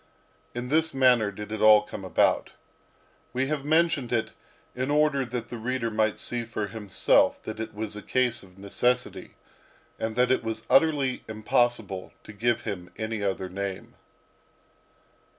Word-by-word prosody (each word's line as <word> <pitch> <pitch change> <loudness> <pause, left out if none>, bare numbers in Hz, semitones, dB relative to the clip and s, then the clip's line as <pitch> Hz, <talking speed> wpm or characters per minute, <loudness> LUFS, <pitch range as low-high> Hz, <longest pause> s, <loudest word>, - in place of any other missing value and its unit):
In 120 +1 -4
this 160 0 +2
manner 125 -5 +4
did 105 +1 -8
it 110 - -4
all 110 -1 +7
come 105 -1 -8
about. 95 - +1 0.8
We 130 +1 0
have 150 -2 -2
mentioned 155 -4 +2
it 115 -2 0 0.4
in 130 +2 -2
order 150 -2 +3
that 120 -1 -5
the 120 - -6
reader 120 0 -2
might 110 0 +1
see 120 -1 -2
for 110 -2 -3
himself 105 -1 +2
that 110 0 -6
it 110 -1 -5
was 105 0 -4
a 105 - -6
case 125 +1 0
of 95 -1 -17
necessity, 100 +5 -1 0.6
and 110 0 -3
that 125 +1 +3
it 130 - +2
was 110 0 -4
utterly 145 -5 +3
impossible 110 -3 0
to 105 - -11
give 115 +3 0
him 90 -5 -5
any 110 -1 -3
other 95 -1 -1
name. 95 0 -5
115 Hz, 155 wpm, -27 LUFS, 105-130 Hz, 0.8 s, all